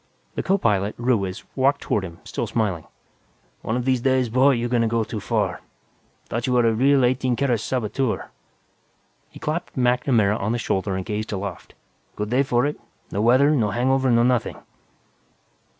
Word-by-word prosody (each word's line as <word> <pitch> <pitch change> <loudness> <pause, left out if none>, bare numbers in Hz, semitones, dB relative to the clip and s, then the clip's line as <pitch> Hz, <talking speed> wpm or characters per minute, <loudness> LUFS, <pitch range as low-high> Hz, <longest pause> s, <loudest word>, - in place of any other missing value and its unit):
The - - -2
co 195 +1 +2
pilot, 105 - 0
Ruiz, 110 -7 -1
walked 140 +1 +2
toward 100 - -1
him, 85 -3 -9
still - - -4
smiling. 100 -8 -2 0.7
"One 110 - -2
of 125 - -3
these 130 -2 +1
days, 130 -1 +2
boy, 130 +4 +4
you 120 -1 -1
gonna 120 -1 +1
go 115 0 +1
too 110 0 -5
far. - - -1 0.7
Thought 120 +2 -3
you 125 - +1
were 120 -1 +3
a 115 - +3
real, 135 +3 +4
eighteen 125 0 +1
carat 125 -3 +1
saboteur." 120 +1 -2 1.0
He - - -14
clapped 155 0 -4
MacNamara 125 -4 +2
on 110 +3 -1
the - - 0
shoulder 95 -4 -1
and 95 -1 -4
gazed 105 +1 -3
aloft. 95 -3 -6 0.4
"Good 105 +1 -4
day 130 +2 +3
for 125 -2 +1
it. 150 - -3 0.3
No 100 - -1
weather, 130 +6 +5
no 120 -9 +2
hangover, 130 +4 +1
no 120 -1 +4
nothing." 125 -2 +1
120 Hz, 175 wpm, -23 LUFS, 105-130 Hz, 1.0 s, weather